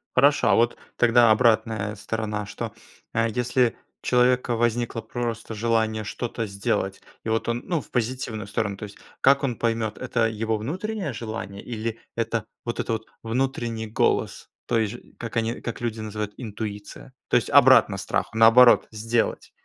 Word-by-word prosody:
Хорошо, 140 +3 +4
а - - +5
вот 120 +1 +2 0.2
тогда 120 -1 +5
обратная 110 -2 +2
сторона, 105 0 -3
что, 100 - -6 0.4
э, 115 0 +2
если, 125 +1 +1 0.3
у - - -16
человека 125 0 +3
возникло 120 0 0
просто 115 0 -4
желание 110 0 0
что-то 115 +1 -4
сделать, 100 -1 -2 0.2
и - - -4
вот 115 0 0
он, 120 +1 -1
ну 170 -4 0
в - - -18
позитивную 120 -3 -2
сторону, 100 -1 -2
то - - -16
есть, 100 -1 -9 0.2
как 140 +1 +5
он 125 -4 0
поймет 115 -2 -1
это 115 -3 +1
его 110 0 -1
внутреннее 185 - -3
желание 110 -3 -6
или 115 -1 -4 0.2
это 115 -1 -1 0.2
вот 120 - -3
этот 110 -1 -1 0.2
внутренний 115 -1 -2
голос, 105 - 0 0.2
то 115 - +1
есть, 110 -1 -1
ж 120 - -8 0.2
как 115 0 -5
они, 115 +1 -1
как 115 - -5
люди 115 -2 -2
называют 105 -1 -4
интуиция. 105 +1 -7 0.2
То - - +2
есть, - - -1
обратно - - +6
страху, - - -2
наоборот 115 +2 +7
сделать. 115 +2 -1
115 Hz, 160 wpm, -25 LUFS, 110-120 Hz, 0.4 s, наоборот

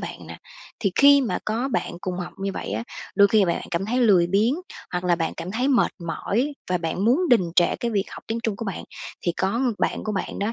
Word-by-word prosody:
bạn - - -7
nè. - - -9 0.4
Thì 195 -5 0
khi 280 0 +7
mà 250 - -1
có 230 +5 -1
bạn - - -2
cùng 185 -1 -4
học 175 - -5
như 195 0 -2
vậy - - -5
á, 110 +2 -2 0.3
đôi 200 -1 +7
khi 210 -2 +4
mà 170 - +1
bạn - - -4
cảm 175 +3 -1
thấy 245 +3 0
lười 195 -8 +5
biếng, 210 +8 +2 0.4
hoặc 180 0 -2
là 175 -1 +3
bạn 165 -1 -1
cảm 180 - -5
thấy 245 +7 0
mệt 255 -4 +3
mỏi 240 - -1 0.2
và 180 - +2
bạn 170 +4 -2
muốn 255 +9 +4
đình 185 -8 +4
trệ 175 - +4
cái 235 - -2
việc 200 -2 0
học - - -9
tiếng 225 +1 -2
Trung 215 -3 -1
của 225 - -5
bạn, 195 - -5 0.4
thì 170 - +2
có 195 +7 -1 0.2
bạn - - -1
của 215 - -2
bạn 195 - -3
đó, 205 +3 -1
200 Hz, 255 wpm, -24 LUFS, 180-235 Hz, 0.4 s, khi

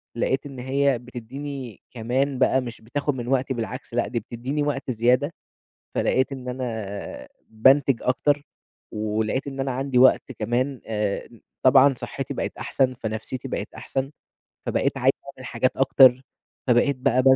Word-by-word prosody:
لقيت 130 +4 0
إن 135 -3 -8
هي 135 0 +1
بتدّيني 125 0 -7
كمان 130 +3 -1
بقى 130 0 +4
مش 120 -2 -8
بتاخد 140 +5 -2
من 120 -2 -5
وقتي، 130 0 +1
بالعكس، 125 +3 -5
لأ 120 0 +1
دي 120 - -2
بتدّيني 125 +6 -3
وقت 140 -2 -2
زيادة، 125 +6 +2 0.6
فلقيت 130 +1 +2
إن 130 -2 -7
أنا، 110 -6 -5 0.2
بانتِج 130 +3 +4
أكتر 145 +3 +2 0.5
ولقيت 110 +5 -1
إن 135 -1 -6
أنا 135 0 0
عندي 135 0 -1
وقت 130 +1 +5
كمان 125 +4 -1
آآ، 105 -2 -2 0.3
طبعًا 135 +1 +7
صحّتي 125 - -5
بقِت - - -4
أحسَن، 130 -1 +1
فنفسيّتي 115 +1 -5
بقِت - - -4
أحسَن، 135 +1 -3 0.6
فبقيت - - 0
عايز - - +4
أعمل - - -10
حاجات - - 0
أكتر، 130 -1 +6 0.4
فبقيت 125 +2 +3
بقى 130 0 +2
130 Hz, 145 wpm, -24 LUFS, 120-135 Hz, 0.6 s, طبعًا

